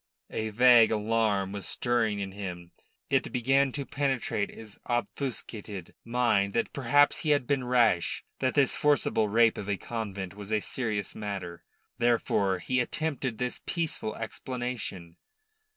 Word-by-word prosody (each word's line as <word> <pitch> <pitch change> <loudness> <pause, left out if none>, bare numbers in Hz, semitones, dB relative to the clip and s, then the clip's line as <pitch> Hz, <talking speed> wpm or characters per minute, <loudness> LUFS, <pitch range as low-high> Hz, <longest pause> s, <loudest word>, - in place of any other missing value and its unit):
A 110 0 -2
vague 120 +1 +7
alarm 105 -3 +1
was 100 -3 -4
stirring 115 -4 +1
in 95 -1 -4
him. 90 -3 -7 0.4
It - - +2
began 135 +2 +2
to 140 -1 -3
penetrate 135 -7 -1
his 110 -2 -12
obfuscated 115 - -4
mind 115 -5 +1
that 115 - 0
perhaps 145 +2 +3
he 155 - -2
had 145 -3 +3
been 135 -1 0
rash, 120 -8 +2 0.2
that 130 -1 0
this 140 -3 +3
forcible 135 -7 +2
rape 115 +1 +4
of 100 - -6
a 100 - 0
convent 100 -5 -5
was 100 +1 -9
a 110 - +3
serious 105 -4 -3
matter. 95 -5 -5 0.4
Therefore 115 -5 +2
he 125 +8 -1
attempted 130 -2 -2
this 125 +1 -2
peaceful 165 -10 -2
explanation. 115 -7 -5
115 Hz, 140 wpm, -29 LUFS, 100-125 Hz, 0.4 s, vague